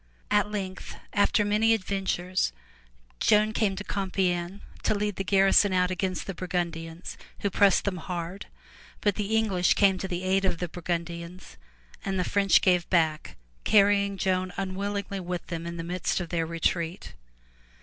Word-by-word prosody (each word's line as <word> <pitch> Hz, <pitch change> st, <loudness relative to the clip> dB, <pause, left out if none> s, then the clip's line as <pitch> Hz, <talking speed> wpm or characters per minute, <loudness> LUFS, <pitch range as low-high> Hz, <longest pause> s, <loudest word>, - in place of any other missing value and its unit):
At 205 Hz, 0 st, +3 dB
length, 190 Hz, -3 st, -5 dB, 0.2 s
after 205 Hz, +1 st, +3 dB
many 220 Hz, +2 st, +3 dB
adventures, 185 Hz, -, -1 dB, 0.7 s
Joan 215 Hz, +1 st, +3 dB
came 205 Hz, -3 st, +1 dB
to 200 Hz, -, -5 dB
Compiegne 190 Hz, -2 st, -1 dB, 0.2 s
to -, -, +1 dB
lead 205 Hz, -1 st, -1 dB
the 195 Hz, -, -1 dB
garrison 195 Hz, +1 st, +4 dB
out 180 Hz, 0 st, +2 dB
against 185 Hz, 0 st, -2 dB
the 195 Hz, -, -4 dB
Burgundians 170 Hz, -2 st, -4 dB, 0.2 s
who 200 Hz, -, 0 dB
pressed 200 Hz, 0 st, +4 dB
them 195 Hz, -3 st, -1 dB
hard, 175 Hz, +3 st, -5 dB, 0.5 s
but 205 Hz, -, +2 dB
the 210 Hz, +2 st, -1 dB
English 195 Hz, -5 st, +2 dB
came 195 Hz, -2 st, +4 dB
to 190 Hz, -, -3 dB
the 180 Hz, -1 st, -4 dB
aid 190 Hz, +1 st, +2 dB
of 190 Hz, -, +1 dB
the 175 Hz, -, -3 dB
Burgundians 170 Hz, +1 st, -5 dB, 0.5 s
and 195 Hz, -1 st, -2 dB
the -, -, +2 dB
French 195 Hz, +1 st, +3 dB
gave 180 Hz, -2 st, +2 dB
back, 160 Hz, -4 st, +1 dB, 0.3 s
carrying 200 Hz, -1 st, +4 dB
Joan 185 Hz, -1 st, 0 dB
unwillingly 195 Hz, +1 st, -3 dB
with 180 Hz, -1 st, -4 dB
them 170 Hz, -1 st, -5 dB
in 170 Hz, 0 st, -5 dB
the 165 Hz, -, -4 dB
midst 180 Hz, +2 st, -1 dB
of 175 Hz, -2 st, -5 dB
their 165 Hz, -2 st, -1 dB
retreat. 170 Hz, +1 st, -2 dB
185 Hz, 160 wpm, -27 LUFS, 175-200 Hz, 0.7 s, garrison